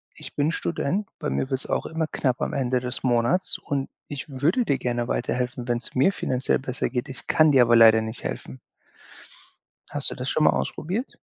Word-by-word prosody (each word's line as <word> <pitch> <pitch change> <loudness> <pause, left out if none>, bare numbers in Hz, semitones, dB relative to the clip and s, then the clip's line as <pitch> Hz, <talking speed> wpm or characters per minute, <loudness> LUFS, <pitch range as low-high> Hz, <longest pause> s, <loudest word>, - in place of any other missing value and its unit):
ich - - -10
bin 145 +2 +1
Student. 165 - -1
Bei 150 - -2
mir 130 - -1
wird's 135 -1 -1
auch - - -1
immer 160 0 -2
knapp 130 -5 -1
am - - -1
Ende 130 -2 +1
des 125 0 -4
Monats 125 +9 +2
und 140 -1 -3 0.2
ich 145 -2 -6
würde 190 - +3
dir 140 - +1
gerne 120 -1 -1
weiterhelfen, 125 0 -2
wenn's 120 0 -2
mir 135 +9 +4
finanziell 130 -7 0
besser 130 -1 -2
geht. 125 +1 -3
Ich 130 - -8
kann 155 -1 +5
dir 135 -3 +6
aber 120 0 +4
leider 110 -1 +7
nicht 110 +2 -6
helfen.“ 65 0 -6 1.3
Hast 145 -1 +1
du - - -5
das 130 +1 -4
schon 155 - +1
mal - - +6
ausprobiert? 195 - -3
130 Hz, 195 wpm, -25 LUFS, 120-150 Hz, 1.3 s, leider